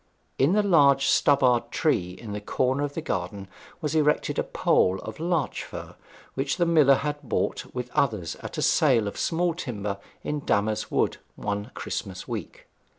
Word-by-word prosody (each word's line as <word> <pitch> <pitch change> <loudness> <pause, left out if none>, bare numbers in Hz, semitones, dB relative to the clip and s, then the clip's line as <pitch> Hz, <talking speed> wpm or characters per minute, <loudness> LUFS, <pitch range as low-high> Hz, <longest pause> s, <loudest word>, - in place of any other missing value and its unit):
In 140 +7 +4
the 210 0 +3
large 140 -8 +5
stubbard 125 -4 +3
tree 90 - 0
at 110 -3 -7
the 105 - -4
corner 130 +6 0
of 145 -1 -3
the 165 - -3
garden 95 - -3 0.3
was 150 -1 -2
erected 150 -1 +2
a - - +2
pole 95 +1 +2
of - - -8
larch 165 -4 -1
fir, - - -9 0.4
which 135 +3 -1
the 175 - +3
miller 155 -5 +5
had 145 +1 -3
bought 135 - -2
with 125 -1 -4
others 105 -11 0
at - - -8
a - - 0
sale 125 -9 +3
of 100 - -5
small 170 +1 0
timber 105 - -4 0.2
in 150 - -2
Damer's 110 -4 0
Wood - - +1 0.2
one 105 +2 -3
Christmas 95 -4 -5
week. - - -6
135 Hz, 170 wpm, -26 LUFS, 105-150 Hz, 0.4 s, large